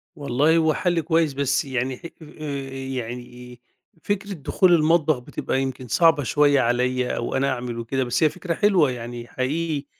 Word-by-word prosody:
والله 145 Hz, +3 st, +2 dB
هو 160 Hz, -1 st, +3 dB
حل 175 Hz, -2 st, 0 dB
كويس، 160 Hz, -2 st, +1 dB
بس 135 Hz, -1 st, 0 dB
يعني 130 Hz, -1 st, -2 dB
ح -, -, -16 dB, 0.2 s
آآ 145 Hz, -3 st, -6 dB
يعني 125 Hz, -2 st, -7 dB, 0.4 s
فكرة 205 Hz, 0 st, -2 dB
دخول 175 Hz, +3 st, +2 dB
المطبخ 160 Hz, -2 st, +3 dB
بتبقى 130 Hz, +2 st, -3 dB
يمكن 130 Hz, -1 st, -4 dB
صعبة 160 Hz, +3 st, +4 dB
شوية 145 Hz, 0 st, +3 dB
عليَّ 125 Hz, +1 st, 0 dB
أو 120 Hz, -, -3 dB
أنا 135 Hz, +1 st, +1 dB
أعمل 120 Hz, -2 st, -5 dB
وكده 130 Hz, +3 st, -1 dB
بس 125 Hz, +5 st, 0 dB
هي 155 Hz, -, +5 dB
فكرة 180 Hz, +1 st, -4 dB
حلوة 175 Hz, -7 st, +3 dB
يعني 120 Hz, 0 st, -7 dB
حقيقي، 145 Hz, +3 st, -2 dB
135 Hz, 160 wpm, -23 LUFS, 125-160 Hz, 0.4 s, هي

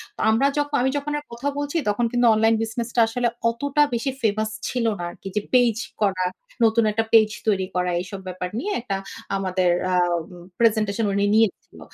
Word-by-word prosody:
তো -, -, -17 dB
আমরা 230 Hz, +6 st, +3 dB
যক 290 Hz, 0 st, +1 dB
আমি 260 Hz, -, +2 dB
যখন 285 Hz, +1 st, -3 dB
আর -, -, -14 dB
কথা 235 Hz, +4 st, -4 dB
বলছি 290 Hz, +3 st, -2 dB
তখন 210 Hz, +4 st, +1 dB
কিন্তু 245 Hz, 0 st, +2 dB
অনলাইন 225 Hz, +1 st, +3 dB
বিজনেসটা 235 Hz, +1 st, -3 dB
আসলে 240 Hz, +2 st, 0 dB, 0.2 s
অতটা 285 Hz, +5 st, 0 dB
বেশি 240 Hz, +4 st, -1 dB
ফেমাস 215 Hz, 0 st, +1 dB, 0.2 s
ছিল 245 Hz, -2 st, -1 dB
না, -, -, -4 dB
আরকি 195 Hz, -, -11 dB
যে 210 Hz, -, +1 dB
পেজ 245 Hz, -3 st, +4 dB, 0.3 s
করা, 190 Hz, -2 st, +1 dB, 0.4 s
নতুন 225 Hz, +1 st, +4 dB
একটা 225 Hz, +2 st, 0 dB
পেজ 220 Hz, -1 st, +7 dB, 0.2 s
তৈরি 195 Hz, -3 st, +2 dB
করা 180 Hz, 0 st, +1 dB
এইসব 190 Hz, +2 st, -7 dB
ব্যাপার 180 Hz, 0 st, -4 dB
নিয়ে 415 Hz, -, -3 dB
একটা 200 Hz, -5 st, -3 dB, 0.4 s
আমাদের 185 Hz, -2 st, +1 dB, 0.2 s
আম 175 Hz, -2 st, +1 dB, 0.4 s
প্রেজেন্টেশন 220 Hz, -1 st, +2 dB
উনি 200 Hz, +1 st, +2 dB
নিয়েছিল। 220 Hz, -2 st, 0 dB
225 Hz, 180 wpm, -23 LUFS, 195-245 Hz, 0.4 s, পেজ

